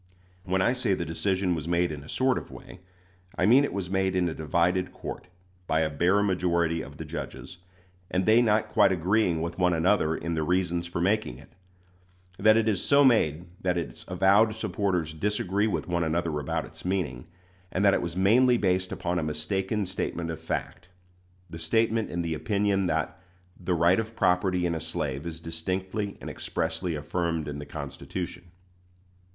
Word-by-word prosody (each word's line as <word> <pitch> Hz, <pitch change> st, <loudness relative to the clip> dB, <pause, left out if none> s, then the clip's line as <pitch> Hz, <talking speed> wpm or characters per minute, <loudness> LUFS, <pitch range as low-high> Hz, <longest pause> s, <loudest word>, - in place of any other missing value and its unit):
When 95 Hz, 0 st, +1 dB
I 120 Hz, -, +3 dB
say 125 Hz, -6 st, +1 dB
the 85 Hz, -, -3 dB
decision 95 Hz, +3 st, 0 dB
was 80 Hz, -2 st, -4 dB
made 85 Hz, -1 st, +1 dB
in 75 Hz, -2 st, -7 dB
a 75 Hz, -, -13 dB
sort 130 Hz, 0 st, +1 dB
of -, -, -13 dB
way, 90 Hz, -, -12 dB, 0.6 s
I 90 Hz, -, +2 dB
mean 125 Hz, +7 st, +6 dB
it -, -, -1 dB
was 100 Hz, -2 st, -3 dB
made 95 Hz, 0 st, 0 dB
in 90 Hz, -1 st, +2 dB
a 80 Hz, -, -2 dB
divided 85 Hz, +4 st, 0 dB
court, -, -, -7 dB, 0.4 s
by 80 Hz, -, +2 dB
a 80 Hz, -2 st, 0 dB
bare 90 Hz, +7 st, +2 dB
majority 85 Hz, -4 st, +1 dB
of -, -, -10 dB
the -, -, -6 dB
judges, 90 Hz, -, -7 dB, 0.5 s
and 95 Hz, 0 st, 0 dB
they 110 Hz, +2 st, +6 dB
not 110 Hz, -2 st, +2 dB
quite -, -, +4 dB
agreeing 90 Hz, -1 st, +1 dB
with 85 Hz, +2 st, -5 dB
one 90 Hz, -1 st, +3 dB
another 80 Hz, -1 st, +2 dB
in 85 Hz, 0 st, -3 dB
the 80 Hz, -, -1 dB
reasons 85 Hz, +1 st, 0 dB
for 85 Hz, 0 st, -3 dB
making 95 Hz, -, 0 dB
it; 70 Hz, -, -17 dB, 0.9 s
that 110 Hz, +2 st, +6 dB
it 115 Hz, -1 st, +2 dB
is 105 Hz, -4 st, +1 dB
so 140 Hz, 0 st, +5 dB
made 85 Hz, -, +3 dB, 0.2 s
that 90 Hz, -1 st, 0 dB
its 75 Hz, -8 st, -5 dB
avowed 100 Hz, +4 st, +4 dB
supporters 95 Hz, -7 st, -1 dB
disagree 100 Hz, +3 st, 0 dB
with 105 Hz, -, -2 dB
one 85 Hz, -1 st, 0 dB
another 80 Hz, -1 st, -1 dB
about 70 Hz, -, -2 dB
its -, -, -12 dB
meaning, 90 Hz, -10 st, -2 dB, 0.4 s
and 95 Hz, +2 st, +1 dB
that 100 Hz, -, +6 dB
it -, -, +1 dB
was 85 Hz, -1 st, -4 dB
mainly 120 Hz, +6 st, +5 dB
based 95 Hz, -3 st, 0 dB
upon 90 Hz, 0 st, -2 dB
a -, -, -2 dB
mistaken 95 Hz, +7 st, -1 dB
statement 85 Hz, -2 st, -3 dB
of 80 Hz, -, -7 dB
fact 90 Hz, -, -4 dB, 0.6 s
the 80 Hz, -, -9 dB
statement 110 Hz, +6 st, +1 dB
in 85 Hz, 0 st, -2 dB
the 85 Hz, -1 st, -2 dB
opinion 100 Hz, +2 st, 0 dB
that 80 Hz, +1 st, -2 dB, 0.3 s
"the 90 Hz, 0 st, -2 dB
right 85 Hz, +4 st, +4 dB
of 110 Hz, 0 st, -4 dB
property 90 Hz, -2 st, +2 dB
in 85 Hz, -, 0 dB
a 80 Hz, -, -3 dB
slave 80 Hz, -2 st, -3 dB
is 80 Hz, -1 st, -6 dB
distinctly 95 Hz, +5 st, -3 dB
and -, -, -9 dB
expressly 80 Hz, +1 st, -3 dB
affirmed 80 Hz, +1 st, -2 dB
in 70 Hz, 0 st, -5 dB
the 75 Hz, -, -8 dB
Constitution." 90 Hz, -1 st, -6 dB
90 Hz, 185 wpm, -27 LUFS, 80-100 Hz, 0.9 s, mean